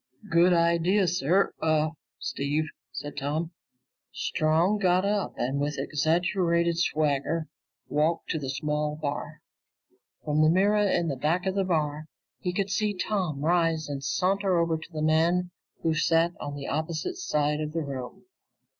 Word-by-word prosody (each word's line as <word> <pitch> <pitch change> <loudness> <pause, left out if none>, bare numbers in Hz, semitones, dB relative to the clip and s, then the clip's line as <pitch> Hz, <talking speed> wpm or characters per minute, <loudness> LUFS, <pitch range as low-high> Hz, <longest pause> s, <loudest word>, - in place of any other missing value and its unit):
"Good 170 +2 +5
idea, 170 +3 +3
sir 175 +3 +2
uh 155 -1 +2 0.3
Steve," 145 +3 -1 0.3
said 135 +3 -7
Tom. 155 +4 -2 0.6
Strong 165 +7 +1
got 185 -1 +3
up 205 -1 -1
and 135 +3 -1
with 145 +1 -1
an 135 - -1
exaggerated 170 +2 +1
swagger 155 0 0 0.4
walked 155 +3 0
to 160 - -1
the 135 -3 -5
small 150 +2 -1
bar. 150 0 -5 0.8
From 150 0 +2
the 155 - +5
mirror 205 +4 +3
in 165 -6 +1
back 165 +6 +1
of 190 - 0
the 195 0 +1
bar, 155 -4 -1 0.3
he 180 - -2
could 195 +2 -2
see 210 0 0
Tom 180 -7 -2
rise 165 -2 +2
and 140 -1 -5
saunter 185 +7 +1
over 170 -1 +2
to 160 - -12
the 155 -2 -3
man 170 +3 +2 0.3
who 165 - +2
sat 165 +2 +3
on 145 0 -5
the 140 -1 -6
opposite 160 - -2
side 150 - 0
of 150 0 -3
the 165 -1 -1
room. 130 -3 -7
160 Hz, 155 wpm, -27 LUFS, 150-180 Hz, 0.8 s, Good